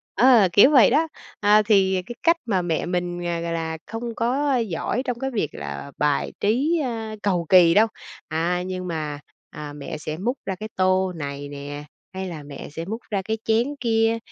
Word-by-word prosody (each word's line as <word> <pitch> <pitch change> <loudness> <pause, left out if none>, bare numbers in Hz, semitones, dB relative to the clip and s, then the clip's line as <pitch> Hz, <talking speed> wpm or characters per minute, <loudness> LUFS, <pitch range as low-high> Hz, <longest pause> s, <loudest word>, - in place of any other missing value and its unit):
Ờ, 235 -2 +6
kiểu 260 +8 +7
vậy 260 -6 +7
đó. 320 +1 +3 0.3
À, 210 +1 +5
thì 195 -3 +3
cái 240 - -7
cách 335 0 +4
mà 195 -6 +1
mẹ 170 -2 -1
mình, 175 0 -2
à, 170 -1 -1
gọi 170 0 -3
là, 160 -1 -3
không 230 0 -5
có 265 +4 +1
giỏi 230 +3 -2
trong 245 -2 -3
cái 270 0 -2
việc 205 - -1
là 75 - -7
bài 145 -1 +1
trí, 270 +11 +2
a, 225 -4 -4
cầu 180 -4 +1
kỳ 175 -3 +7
đâu. 220 +4 +5 0.4
À, 170 +3 0
nhưng 185 0 -4
mà, 155 -4 -4 0.3
à, 150 -1 -8
mẹ 145 +1 -6
sẽ 155 0 -5
múc 240 +9 -2
ra 190 - -2
cái 215 +4 -7
tô 185 0 +2
này 145 -2 -5
nè, 145 +1 -7 0.3
hay 190 0 -4
là 160 -4 -7
mẹ 140 -1 -9
sẽ 165 +3 -6
múc 220 +5 -4
ra 200 - 0
cái 220 +3 -2
chén 235 +6 +1
kia. 225 -1 +2
190 Hz, 200 wpm, -23 LUFS, 165-225 Hz, 0.4 s, kiểu